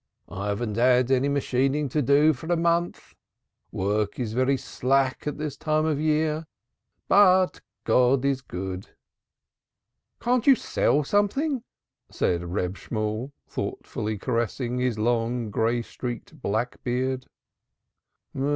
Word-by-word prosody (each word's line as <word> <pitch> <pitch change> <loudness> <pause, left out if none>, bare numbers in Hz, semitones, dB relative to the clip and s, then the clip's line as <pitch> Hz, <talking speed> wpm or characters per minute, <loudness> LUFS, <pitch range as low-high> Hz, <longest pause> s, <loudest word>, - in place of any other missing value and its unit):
"I 100 +2 -4
haven't 105 +1 -2
had 125 +1 +4
any 135 +2 +3
machining 140 +1 +1
to 150 +4 0
do 145 +4 +4
for 160 +4 -9
a 175 - +3
month. 170 +1 0 0.6
Work 105 +2 -1
is 115 -3 -2
very 130 +3 +2
slack 135 +2 0
at 150 - -2
this 150 -2 -4
time 155 0 0
of 155 -3 0
year. 155 0 0 0.6
But 185 -2 +5 0.2
God 125 +1 +3
is 135 -1 +1
good." 95 -3 -6 1.2
"Can't 245 +1 +1
you 275 - +9
sell 150 - +1
something?" 230 - +1 0.5
said 85 -1 0
Reb 90 +1 -2
Shemuel, 110 +5 -3 0.2
thoughtfully 105 0 -4
caressing 120 +2 -2
his 125 -3 0
long, 115 0 0
gray 115 +3 +1
streaked 130 - -7
black 110 +4 -2
beard. 130 +1 -1
130 Hz, 125 wpm, -25 LUFS, 115-150 Hz, 1.2 s, you